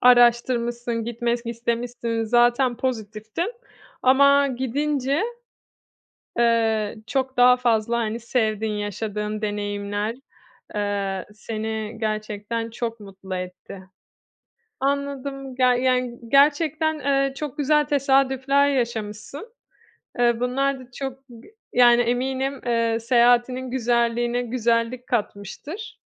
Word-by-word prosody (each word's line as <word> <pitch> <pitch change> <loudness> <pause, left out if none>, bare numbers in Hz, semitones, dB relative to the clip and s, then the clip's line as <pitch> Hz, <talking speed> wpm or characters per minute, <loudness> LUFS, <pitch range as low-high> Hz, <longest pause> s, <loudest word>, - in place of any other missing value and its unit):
araştırmışsın, 240 -1 +3
gitmek 235 0 -1
istemişsin. 235 0 -2
Zaten 240 +2 +3
pozitiftin 220 - -3 0.5
ama 280 +2 +5
gidince, 275 - -1 1.2
eee, 225 -2 +2
çok 265 0 -1
daha 250 0 +7
fazla, 235 -1 +1
hani, 225 0 -2
sevdiğin, 220 -3 -1
yaşadığın 210 +1 -3
deneyimler, 205 +1 -2 0.6
eee, 200 -2 -2
seni 220 0 -5
gerçekten 215 +1 -3
çok 230 0 -4
mutlu 195 -2 -8
etti. 180 +1 -7 1.0
Anladım. 275 -1 -2
Ger 250 -1 +4
yani 250 -1 0
gerçekten, 305 +3 +3
eee, 275 -1 +1
çok 295 0 -6
güzel 300 +1 +3
tesadüfler 275 0 +2
yaşamışsın. 235 - -3 0.7
Eee, 235 -1 +3
bunlar 265 +2 0
da 250 -1 -14
çok 270 +1 -5 0.2
g 240 - -16 0.2
yani, 240 -1 +6
eminim, 260 +3 -1
eee, 230 -1 +1
seyahatinin 245 +1 +3
güzelliğine 240 0 +1
güzellik 235 0 0
katmıştır. 240 - -4
240 Hz, 95 wpm, -23 LUFS, 220-265 Hz, 1.2 s, daha